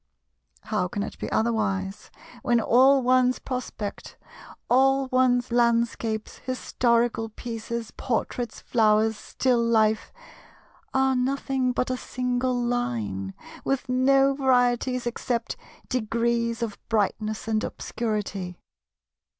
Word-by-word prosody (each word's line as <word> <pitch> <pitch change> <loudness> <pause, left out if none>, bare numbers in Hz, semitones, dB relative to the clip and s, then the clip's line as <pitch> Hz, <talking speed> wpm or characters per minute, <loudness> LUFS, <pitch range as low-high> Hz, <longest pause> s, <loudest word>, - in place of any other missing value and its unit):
How 180 - -1
can 200 +3 -3
it - - -7
be - - -4
otherwise, 205 -4 -1 0.3
when 240 -1 +2
all 260 +4 +5
one's 255 0 +3
prospect, 250 -5 -6 0.5
all 270 +2 +4
one's 255 -2 +2
landscapes, 235 -2 0
historical 235 -3 0
pieces, 230 0 -5
portraits, 240 0 -3
flowers, 220 -1 +3
still 245 +2 0
life, 220 -2 +2 0.8
are 265 0 +2
nothing 265 0 0
but 250 +1 -1
a 255 - -1
single 250 0 -1
line, 115 - -2 0.3
with 270 -1 -1
no 270 +2 +4
varieties 250 -2 +2
except 240 0 -2 0.3
degrees 235 0 0
of 215 -3 -4
brightness 215 0 -1
and 220 -1 0
obscurity? 205 -5 -3
235 Hz, 100 wpm, -25 LUFS, 220-255 Hz, 0.8 s, all